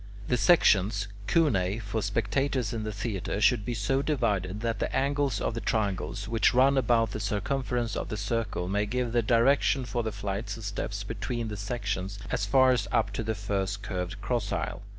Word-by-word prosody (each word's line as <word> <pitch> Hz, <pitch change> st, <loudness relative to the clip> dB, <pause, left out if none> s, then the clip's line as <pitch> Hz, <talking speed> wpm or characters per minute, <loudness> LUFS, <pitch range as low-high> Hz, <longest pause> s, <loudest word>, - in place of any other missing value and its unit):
The 125 Hz, -, +3 dB
sections 105 Hz, -, +4 dB, 0.2 s
(cunei) 105 Hz, -, +2 dB
for 110 Hz, +1 st, -3 dB
spectators 115 Hz, +4 st, 0 dB
in 115 Hz, -, -2 dB
the 110 Hz, -, -3 dB
theatre 105 Hz, -2 st, -3 dB
should 110 Hz, 0 st, +4 dB
be 120 Hz, +3 st, -3 dB
so 125 Hz, +6 st, +1 dB
divided, 105 Hz, -, -1 dB
that 115 Hz, -3 st, -1 dB
the -, -, -1 dB
angles 140 Hz, 0 st, +1 dB
of -, -, -1 dB
the 115 Hz, -, -4 dB
triangles 100 Hz, -1 st, -1 dB
which 115 Hz, +1 st, +2 dB
run 135 Hz, +2 st, +5 dB
about 115 Hz, -4 st, +2 dB
the 110 Hz, -, -4 dB
circumference 120 Hz, +3 st, -1 dB
of -, -, -3 dB
the 110 Hz, -, -3 dB
circle 105 Hz, -3 st, -2 dB
may 105 Hz, +2 st, 0 dB
give 125 Hz, +1 st, -1 dB
the 120 Hz, 0 st, +3 dB
direction 125 Hz, +3 st, +3 dB
for 120 Hz, +1 st, -2 dB
the 110 Hz, -1 st, -2 dB
flights 100 Hz, +2 st, -4 dB
of 115 Hz, -, -9 dB
steps 100 Hz, 0 st, -3 dB
between 115 Hz, +2 st, -3 dB
the 105 Hz, -, -4 dB
sections, 100 Hz, -2 st, -3 dB
as 105 Hz, -3 st, 0 dB
far 130 Hz, +4 st, +5 dB
as 110 Hz, -6 st, 0 dB
up 110 Hz, -4 st, +1 dB
to 105 Hz, -, -2 dB
the 110 Hz, 0 st, -2 dB
first 100 Hz, 0 st, -2 dB
curved 90 Hz, -3 st, -4 dB
cross 120 Hz, -5 st, -1 dB
aisle. -, -, -3 dB
110 Hz, 190 wpm, -28 LUFS, 100-120 Hz, 0.2 s, run